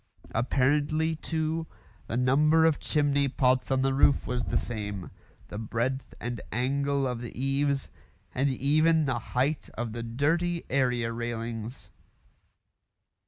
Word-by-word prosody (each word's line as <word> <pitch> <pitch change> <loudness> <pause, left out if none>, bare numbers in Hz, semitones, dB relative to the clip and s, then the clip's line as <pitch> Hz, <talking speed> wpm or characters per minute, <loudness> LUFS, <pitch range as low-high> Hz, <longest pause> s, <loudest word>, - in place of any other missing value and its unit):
Apparently, 145 +6 +1
too, 160 0 -2 0.4
the 115 - -2
number 150 +6 +4
of 160 -2 +3
chimney 145 -2 +1
pots 130 -1 +2
on 130 -1 +2
the 135 0 +2
roof 140 +1 +4
was 125 -1 -2
the - - 0
same; 105 -5 -4 0.4
the 105 - -5
breadth 120 +4 -2
and 120 -1 -4
angle 140 +3 0
of 125 -2 -2
the 120 0 -7
eaves; 135 +1 +1 0.5
and 135 +2 +1
even 155 +4 +3
the 130 -3 0
height 130 +6 -1
of 115 -1 -3
the 115 - -4
dirty 165 +9 0
area 125 -3 +1
railings. 115 0 -5
135 Hz, 130 wpm, -28 LUFS, 120-145 Hz, 0.5 s, number